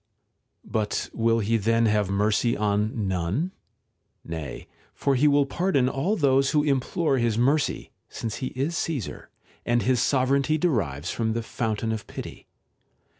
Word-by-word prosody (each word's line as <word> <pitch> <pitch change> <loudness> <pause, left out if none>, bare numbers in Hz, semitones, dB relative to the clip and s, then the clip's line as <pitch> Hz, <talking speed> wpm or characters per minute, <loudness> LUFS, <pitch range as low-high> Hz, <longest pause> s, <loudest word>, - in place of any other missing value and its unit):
§ - - -50
3. - - -17
But 105 -2 -1
will 115 0 +2
he 115 +2 +1
then 115 +2 +2
have 105 -3 +2
mercy 105 +4 +1
on 105 +1 0
none? 95 - -1 0.7
Nav,__for 80 - -4
he 140 +4 +4
will 145 -1 +4
pardon 145 -4 +1
all 140 +11 0
those 135 -5 +3
who 150 -1 +2
implore 140 +1 +1
his 115 -2 +1
mercy, 140 +5 +1 0.2
since 115 -1 -5
ho 130 - -2
is 140 +6 -1
Caesar, 145 - -4 0.3
and 120 -2 +1
his 125 0 +2
sovereignty 140 +3 +2
derives 90 - -1
from 110 -1 -1
the 115 0 -2
fountain 110 -1 -2
of 110 -1 -4
pity. - - -8
120 Hz, 150 wpm, -25 LUFS, 105-140 Hz, 0.7 s, he